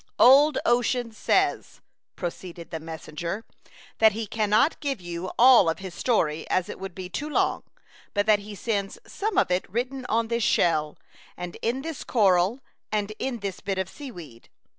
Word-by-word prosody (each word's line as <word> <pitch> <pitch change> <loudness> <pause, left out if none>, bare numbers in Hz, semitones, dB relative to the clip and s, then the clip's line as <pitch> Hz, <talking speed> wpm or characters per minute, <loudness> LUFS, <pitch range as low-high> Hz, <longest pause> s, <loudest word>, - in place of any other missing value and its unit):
" - - -42
Old 285 +4 +7
Ocean 240 0 +1
says," 220 - 0 0.4
proceeded 175 -1 -7
the 160 - -4
messenger, 165 +5 -6 0.3
" - - -23
that 220 -2 +6
he 225 +1 -3
cannot 215 +7 +2
give 275 -6 -2
you 175 +1 -5
all 240 -7 +7
of 165 - -1
his 190 -2 -8
story, 165 -8 0
as 185 +2 0
it - - -7
would 190 -2 -7
be 185 -1 -6
too 295 +11 -4
long, - - +1 0.5
but 205 0 +2
that 215 -1 +4
he 205 +1 -9
sends 200 -2 -2
some 415 -1 -3
of 375 - +3
it 180 +1 0
written 250 +5 -3
on 225 +1 +1
this 235 +1 -1
shell, 155 -6 +2 0.4
and 180 -1 -6
in 250 +4 -1
this 325 -3 -5
coral 200 +1 +2 0.3
and 210 0 -1
in 250 -4 -3
this 195 -2 -4
bit 195 -1 -3
of 190 -1 -1
sea 280 +7 -9
weed. 155 - -12
205 Hz, 185 wpm, -26 LUFS, 180-240 Hz, 0.5 s, Old